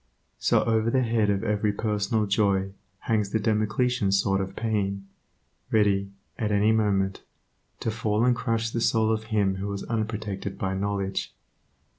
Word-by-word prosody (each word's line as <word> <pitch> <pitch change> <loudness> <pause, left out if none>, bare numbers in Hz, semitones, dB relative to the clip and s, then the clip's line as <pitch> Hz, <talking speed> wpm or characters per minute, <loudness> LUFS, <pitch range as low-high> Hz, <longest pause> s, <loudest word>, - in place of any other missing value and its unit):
So - - +3
over 110 0 +1
the 130 +2 +2
head 115 -3 +1
of 100 0 0
every 105 -1 +1
personal 105 0 0
joy 100 -1 +1 0.3
hangs 105 -3 0
the 110 - 0
Damocletian 110 +1 +1
sword 95 0 +2
of 95 0 -5
pain, 100 -3 -1 0.6
ready, 100 -2 +2 0.3
at 105 -3 0
any 105 +2 +3
moment, 100 -3 +1 0.6
to 115 - -1
fall 110 0 0
and 125 -1 +4
crush 115 -1 -1
the 115 - -2
soul 110 -1 +2
of 110 0 -1
him 100 -4 +1
who 100 +2 -3
is 100 - -5
unprotected 105 -3 -3
by 95 0 -2
knowledge. 100 0 -2
105 Hz, 155 wpm, -26 LUFS, 100-110 Hz, 0.6 s, and